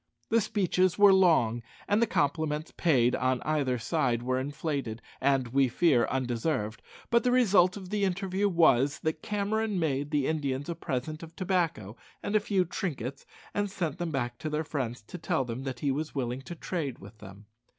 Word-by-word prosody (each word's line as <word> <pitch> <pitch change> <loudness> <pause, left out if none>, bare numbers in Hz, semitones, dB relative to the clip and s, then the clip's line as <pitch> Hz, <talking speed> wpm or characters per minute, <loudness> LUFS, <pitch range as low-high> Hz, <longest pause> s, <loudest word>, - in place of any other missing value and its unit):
The 230 0 +4
speeches 185 -4 +1
were 205 -1 +7
long, 160 -12 +4 0.3
and 205 +2 +2
the 235 - +3
compliments 150 0 -1
paid 125 -8 +3
on 130 +1 +1
either 145 -5 0
side 120 -2 0
were 130 +1 0
inflated, 140 -4 -3 0.2
and, 135 -3 +2
we 135 +2 +3
fear, 125 -1 +3
undeserved; 125 -3 -2 0.3
but 235 -1 +4
the 250 - +2
result 200 -7 +4
of 190 -1 -9
the 210 -1 0
interview 195 +1 0
was, 145 -6 +4
that 160 0 -2
Cameron 210 0 -1
made 145 -3 -1
the 145 -3 +1
Indians 145 -2 -2
a - - 0
present 155 -1 -4
of 165 -1 -11
tobacco 170 - -1 0.3
and 205 - -2
a - - +6
few 200 -4 +1
trinkets, 140 - -4 0.3
and 205 0 0
sent 175 -4 -3
them 175 -1 -2
back 120 -5 -3
to 155 - -3
their 150 +1 -1
friends 125 -7 -4
to 175 +11 -9
tell 160 -5 0
them 125 +3 -5
that 130 -3 -5
he 140 - +1
was 150 +3 -3
willing 125 -1 -2
to 170 +6 -8
trade 155 -6 -3
with 105 +3 -14
them. 100 0 -12
155 Hz, 185 wpm, -29 LUFS, 130-185 Hz, 0.3 s, were